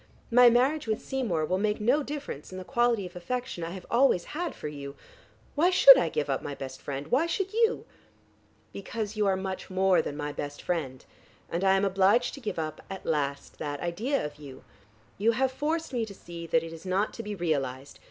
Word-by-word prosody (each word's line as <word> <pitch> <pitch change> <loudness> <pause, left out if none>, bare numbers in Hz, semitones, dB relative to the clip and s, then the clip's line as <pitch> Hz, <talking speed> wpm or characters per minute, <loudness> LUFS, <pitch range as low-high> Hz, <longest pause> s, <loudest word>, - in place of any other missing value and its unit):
My 245 +1 +8
marriage 260 +4 +2
with 215 -1 -2
Seymour 215 -13 -1
will 185 +3 0
make 210 +1 0
no 250 +8 +3
difference 285 - -6
in 185 - -7
the 185 - -6
quality 240 -3 +1
of 180 0 -10
affection 180 0 -4
I 165 - -3
have 185 0 -8
always 235 -7 +4
had 345 +3 -3
for - - -6
you. 140 -1 -7 0.6
Why 330 +5 +3
should - - +10
I - - +1
give 465 - -1
up - - -1
my 145 - -5
best 130 -1 -8
friend? 140 +1 -5
Why 285 +7 +3
should 385 +3 -2
you?" 455 +1 +2 0.9
"Because 215 +1 -5
you 210 -1 +1
are 195 - +3
much 190 0 -5
more 190 0 +3
than 145 - -5
my 145 -1 -3
best 145 0 -6
friend, 140 -7 -3 0.5
and 170 +3 -1
I 190 0 +5
am 195 - +2
obliged 195 +5 +3
to - - -8
give 215 -7 -4
up, 155 -1 -4
at 195 -1 -7
last, 140 -3 -2
that 145 -1 -4
idea 215 - -1
of 145 0 -7
you. 140 -3 -11 0.6
You 225 +3 +3
have 260 +3 +1
forced 310 +3 -2
me 240 -2 0
to 200 - -10
see 170 -2 -9
that 165 0 +2
it 165 0 -7
is 165 - -10
not 190 +3 0
to - - -6
be 210 -2 -5
realized. 140 -6 -2
195 Hz, 215 wpm, -28 LUFS, 160-245 Hz, 0.9 s, should